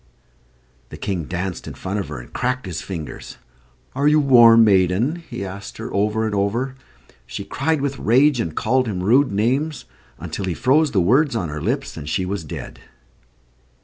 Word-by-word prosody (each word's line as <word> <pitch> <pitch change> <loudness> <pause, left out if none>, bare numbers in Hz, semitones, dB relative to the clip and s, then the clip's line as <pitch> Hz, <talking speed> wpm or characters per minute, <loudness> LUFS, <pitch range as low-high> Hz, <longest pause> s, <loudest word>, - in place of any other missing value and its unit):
The - - -9
King 90 -6 -3
danced 90 +2 -4
in - - -7
front 100 +2 -4
of 100 - -4
her, - - -6
and - - -13
cracked 125 -1 -1
his 90 -3 -5
fingers. 85 -6 -7 0.6
"Are 140 +2 +1
you 150 +1 +5
warm, 120 -5 +7
maiden?" 100 - +2
he 100 - -5
asked 100 +1 -8
her, - - -7
over 105 +2 +1
and 110 - -2
over. 110 +7 -1 0.5
She - - -6
cried 155 +1 -1
with 140 -1 -2
rage, 130 +4 +3
and 80 -8 -3
called 130 +2 +1
him 90 -4 -3
rude 125 +7 +4
names, 125 +7 0 0.3
until 100 - -5
he 90 -3 -2
froze 145 +5 +3
the 105 - +1
words 130 - +3
on 90 -8 -2
her 75 0 -5
lips, - - -2
and 75 - -6
she 95 +3 -1
was 95 -1 -3
dead. 75 - -8
110 Hz, 180 wpm, -21 LUFS, 95-130 Hz, 0.6 s, warm